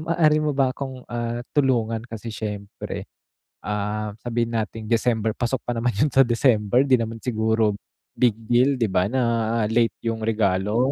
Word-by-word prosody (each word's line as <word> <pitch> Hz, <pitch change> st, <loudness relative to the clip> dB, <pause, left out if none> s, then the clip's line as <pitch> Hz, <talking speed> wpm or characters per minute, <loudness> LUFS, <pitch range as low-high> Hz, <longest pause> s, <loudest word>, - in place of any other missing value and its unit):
maaari 155 Hz, -1 st, +3 dB
mo 150 Hz, -, +1 dB
ba 135 Hz, -2 st, +2 dB
akong, 130 Hz, -2 st, -6 dB
ah, 120 Hz, 0 st, -2 dB, 0.2 s
tulungan 115 Hz, -5 st, +2 dB
kasi 115 Hz, 0 st, -7 dB
siyempre, 105 Hz, -2 st, -6 dB, 0.6 s
ah, 105 Hz, +1 st, -2 dB
sabihin 120 Hz, -1 st, -1 dB
nating 110 Hz, 0 st, -3 dB
December 115 Hz, -1 st, +2 dB
pasok 120 Hz, +1 st, -1 dB
pa 120 Hz, -, -3 dB
naman 120 Hz, +1 st, 0 dB
yun 145 Hz, +7 st, +2 dB
sa 135 Hz, +1 st, +6 dB
December 120 Hz, -1 st, +3 dB
'di 130 Hz, -2 st, +4 dB
naman 115 Hz, 0 st, -4 dB
siguro 110 Hz, -2 st, +1 dB, 0.4 s
big 120 Hz, -4 st, +3 dB
deal 125 Hz, +4 st, +4 dB
di 115 Hz, -4 st, +1 dB
ba 95 Hz, +1 st, +2 dB
na 115 Hz, -2 st, 0 dB
late 115 Hz, 0 st, +2 dB
yung 115 Hz, -1 st, -1 dB
regalo? 105 Hz, +3 st, +1 dB
115 Hz, 160 wpm, -23 LUFS, 110-125 Hz, 0.6 s, sa